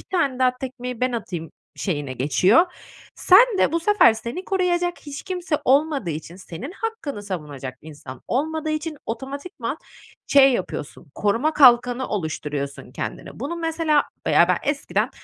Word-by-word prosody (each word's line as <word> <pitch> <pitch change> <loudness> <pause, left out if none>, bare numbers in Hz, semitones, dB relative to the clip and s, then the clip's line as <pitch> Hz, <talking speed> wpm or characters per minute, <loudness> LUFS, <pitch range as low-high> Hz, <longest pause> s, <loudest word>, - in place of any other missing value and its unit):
bir - - -15
tane 285 -8 +1
daha 255 -1 +2
tekmeyi 250 -2 -6
ben 255 0 +1
atayım 175 -8 -5 0.3
şeyine 145 -8 -3
geçiyor. 180 - +4 0.5
Sen 410 +3 +6
de - - +3
bu 335 - +1
sefer 415 - +5
seni 235 +11 -6
koruyacak 355 -2 0
hiç 285 -2 -8
kimse 360 -4 -2
olmadığı 275 - +2
için, 160 +3 -7
senin 195 - -8
hakkını 390 - -5
savunacak 145 -9 -6
insan 145 -4 -10
olmadığı 310 +4 -1
için 310 0 -3
otomatikman 275 +3 -5 0.5
şey 275 -1 +6
yapıyorsun, 160 - -5
koruma 230 +10 +1
kalkanı 250 -2 +5
oluşturuyorsun 150 -7 -4
kendine. - - -6
Bunu, 340 - -3
mesela 325 -3 +1 0.3
ya, - - +5
ben - - +2
eskiden, 285 -1 -1
260 Hz, 140 wpm, -23 LUFS, -, 0.5 s, Sen